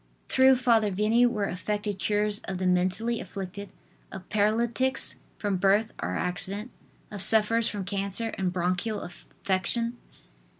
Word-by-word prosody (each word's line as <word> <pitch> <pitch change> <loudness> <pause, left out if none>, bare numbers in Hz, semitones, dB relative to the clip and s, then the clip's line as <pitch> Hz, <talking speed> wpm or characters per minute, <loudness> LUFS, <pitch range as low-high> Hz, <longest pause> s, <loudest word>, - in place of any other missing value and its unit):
Through 260 0 +5
Father 235 -4 +3
Vianney 215 +5 +3
were 210 -4 -1
affected 205 +2 -3
cures 210 +1 +1
of 190 - -4
the 185 - -2
mentally 185 +6 +1
afflicted, 195 +1 -7 0.4
of 190 -1 -9
paralytics 230 +5 +1 0.2
from 205 -2 -1
birth 200 +4 +2
or - - -2
accident, 200 +5 -1 0.4
of 205 -2 -6
sufferers 220 +2 +4
from 205 -4 -4
cancer 200 +3 -2
and 185 -2 -1
bronchial 185 +4 -1
affection. 195 +6 -2
205 Hz, 130 wpm, -27 LUFS, 190-225 Hz, 0.4 s, Through